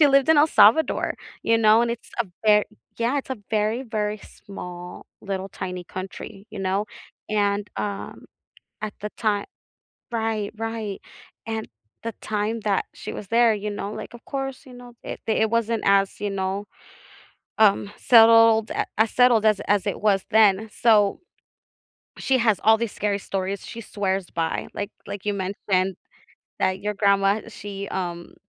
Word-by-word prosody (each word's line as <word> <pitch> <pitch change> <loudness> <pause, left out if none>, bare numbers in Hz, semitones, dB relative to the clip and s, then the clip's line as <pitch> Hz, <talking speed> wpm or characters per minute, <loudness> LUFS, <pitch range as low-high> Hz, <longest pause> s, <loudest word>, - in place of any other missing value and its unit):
She 295 - +8
lived 275 +1 +4
in 320 - +6
El 295 - +6
Salvador, 270 +7 +4 0.3
you 230 0 +3
know, 220 +1 +5
and 235 - 0
it's 235 - -6
a - - +2 0.2
ver 210 -1 +6 0.3
Yeah, 245 +5 +1
it's 270 - -7
a 260 - -3
very, 215 +3 0
very 215 -2 -2
small 180 -3 -10 0.2
little 195 -1 -4
tiny 180 -1 -6
country, 195 +2 -8
you 215 - -8
know, 195 +2 -1 0.4
and, 205 -1 0
um, 200 -1 -5 0.6
at 215 -1 -4
the 210 0 -4
time 210 -3 0 0.7
Right, 220 -3 -1
right, 225 -3 -4 0.5
and, 220 -1 -3 0.4
the 230 - -4
time 215 +1 -2
that 205 -2 0
she - - -7
was 200 - -7
there, 230 -1 +4
you 210 0 -3
know, 205 0 -4
like, - - -8
of 235 - -15
course, 270 0 -5
you 255 - -13
know, 245 -1 -12
it - - -6
the 220 - +2
it 220 - +3
wasn't 230 -1 0
as, 195 0 +3
you 205 - -2
know, 195 +1 -2 0.9
um, 205 -1 +4
settled 225 -1 +6
a - - -1
as 220 0 +3
settled 245 -3 +4
as 215 -2 +4
as 205 0 +2
it 200 - -2
was 200 -3 +2
then, 215 0 +4
so, 210 -4 +3 1.0
she 265 -1 +1
has 220 -5 +2
all 220 0 +6
these 230 -2 -2
scary 205 -1 -1
stories, 195 0 -4
she 230 0 -8
swears 195 -3 -2
by. 165 -1 -2
Like 205 +1 -4 0.2
like 200 0 -7
you 205 - +1
mentioned 190 -1 -1 0.7
that 190 0 +1
your 210 0 -2
grandma 200 +1 +3
she, 200 -1 -7
um, 175 -2 -4
210 Hz, 165 wpm, -24 LUFS, 195-225 Hz, 1.0 s, She